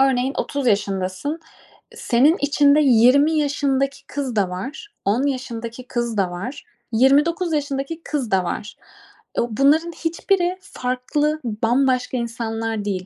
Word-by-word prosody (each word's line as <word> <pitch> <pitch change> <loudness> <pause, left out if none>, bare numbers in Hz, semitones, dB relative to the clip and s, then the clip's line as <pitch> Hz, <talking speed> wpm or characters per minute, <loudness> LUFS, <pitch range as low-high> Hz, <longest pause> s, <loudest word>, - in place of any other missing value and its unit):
örneğin 265 0 +2
30 280 -3 -2
yaşındasın. 200 - -1 0.5
E, - - -16
senin 295 - +3
içinde 285 0 +4
20 265 +4 +5
yaşındaki 275 -2 0
kız 270 -5 -4
da 195 -3 +1
var. 265 - -6 0.2
10 225 +7 +2
yaşındaki 245 -2 -5
kız 235 -3 -2
da 185 -3 +1
var. 225 +11 -6 0.3
29 295 +8 +3
yaşındaki 285 +2 -2
kız 270 -8 -3
da 190 -1 +3
var. 205 +4 -5 0.6
Eee, - - +3
bunların 295 +8 +3
hiçbiri 350 +2 0
farklı, 295 0 -2
bambaşka 250 +3 +1
insanlar 225 -2 -3
değil. 185 -2 -2
260 Hz, 130 wpm, -21 LUFS, 225-290 Hz, 0.6 s, 20